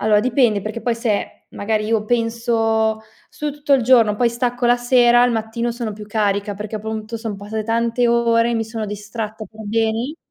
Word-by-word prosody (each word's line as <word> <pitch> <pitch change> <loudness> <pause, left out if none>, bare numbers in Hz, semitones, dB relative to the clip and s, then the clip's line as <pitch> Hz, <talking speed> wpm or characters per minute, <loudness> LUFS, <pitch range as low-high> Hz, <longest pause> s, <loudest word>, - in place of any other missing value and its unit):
allora, 210 -1 +3
dipende 235 -3 +2
perché 215 +2 -5
poi 240 -1 0
se, 230 -3 -3
magari, 215 +1 -2
io 220 -1 0
penso: 225 -1 0 0.3
"Studio 300 -1 -4
tutto 290 -1 -1
il 260 - +2
giorno, 230 -3 +5
poi 240 +1 +3
stacco 245 +1 -2
la 240 0 +4
sera, 245 0 +4
al 245 0 +3
mattino 230 +1 -2
sono 235 -2 -4
più 210 0 -10
carica", 205 -1 -1
perché 210 +2 -5
appunto 220 +1 -5
son 225 -2 -5
passate 210 +2 -5
tante 230 +2 +1
ore, 235 0 +2
mi 225 -1 0
sono 220 -1 -5
distratta 210 +1 -6
per 220 +1 -15
beni 225 +6 -1
225 Hz, 185 wpm, -20 LUFS, 215-240 Hz, 0.3 s, giorno